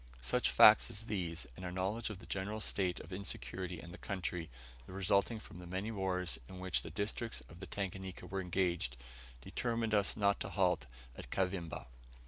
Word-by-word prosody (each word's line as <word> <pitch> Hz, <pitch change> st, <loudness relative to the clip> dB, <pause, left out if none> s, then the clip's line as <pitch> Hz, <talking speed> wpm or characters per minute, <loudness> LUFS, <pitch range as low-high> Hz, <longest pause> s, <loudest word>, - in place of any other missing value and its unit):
Such 65 Hz, -, +2 dB
facts -, -, +9 dB
as 105 Hz, -, -3 dB
these, 90 Hz, -7 st, -1 dB
and 95 Hz, -, -9 dB
our 90 Hz, -, -3 dB
knowledge 95 Hz, +6 st, -1 dB
of 105 Hz, -, -5 dB
the -, -, -12 dB
general 100 Hz, +3 st, -2 dB
state 95 Hz, -4 st, +1 dB
of 85 Hz, +5 st, -9 dB
insecurity 95 Hz, -2 st, -3 dB
in 85 Hz, -, -9 dB
the -, -, -9 dB
country, 90 Hz, -3 st, -3 dB, 0.4 s
resulting 100 Hz, +4 st, +2 dB
from 90 Hz, -, -11 dB
the 90 Hz, -, -8 dB
many 95 Hz, +5 st, -2 dB
wars 90 Hz, -7 st, 0 dB
in 95 Hz, -, -8 dB
which 95 Hz, -1 st, +1 dB
the -, -, -7 dB
districts 105 Hz, -, -2 dB
of 85 Hz, -, -13 dB
the 95 Hz, -, -6 dB
Tanganika 95 Hz, -1 st, -4 dB
were 95 Hz, 0 st, -2 dB
engaged, 90 Hz, -8 st, 0 dB, 0.4 s
determined 115 Hz, -, -1 dB
us 100 Hz, 0 st, +3 dB
not 100 Hz, -1 st, +3 dB
to -, -, -3 dB
halt 90 Hz, -7 st, +2 dB, 0.3 s
at -, -, -8 dB
Kavimba. 90 Hz, -2 st, -1 dB
95 Hz, 180 wpm, -36 LUFS, 90-100 Hz, 0.4 s, facts